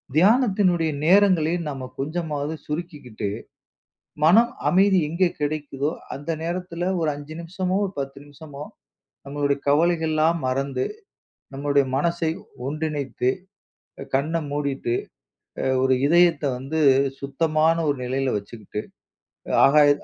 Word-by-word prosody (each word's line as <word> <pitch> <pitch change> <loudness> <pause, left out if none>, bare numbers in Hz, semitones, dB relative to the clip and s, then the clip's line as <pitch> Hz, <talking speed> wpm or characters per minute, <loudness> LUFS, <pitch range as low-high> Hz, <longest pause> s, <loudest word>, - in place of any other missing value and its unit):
தியானத்தினுடைய 190 -4 +3
நேரங்களை 180 -3 +4 0.2
நம்ம 135 -3 -5 0.2
கொஞ்சமாவது 155 0 -3
சுருக்கிக்கிட்டு, 150 - -5 1.0
மனம் 225 +10 +5 0.2
அமைதி 190 +1 +4
எங்கே 175 +3 +2
கிடைக்குதோ 145 -1 -2 0.2
அந்த 145 +4 -6
நேரத்துல 175 +1 -3
ஒரு 160 - 0
5 145 +2 -9
நிமிஷமோ, 185 +2 -2
ஒரு 190 - -8
10 135 0 -4
நிமிஷமோ 145 0 -10 0.6
நம்முடைய 140 0 -1
கவலைகள்லாம் 160 +1 +2
மறந்து, 130 0 -1 0.7
நம்முடைய 140 0 +1
மனசை 170 +2 0 0.4
ஒன்றிணைத்து, 145 -4 -1 0.8
கண்ண 155 +5 0
மூடிட்டு, 140 -4 -2 0.7
அ - - -1 0.2
ஒரு 130 0 +4
இதயத்த 170 -3 +4
வந்து 150 +5 -3 0.4
சுத்தமான 155 +3 +1
ஒரு 140 - -2
நிலையில 130 0 -1
வச்சுக்கிட்டு, 105 0 -7 0.8
ஆகாய 145 +1 +6
155 Hz, 100 wpm, -23 LUFS, 140-170 Hz, 1.0 s, ஆகாய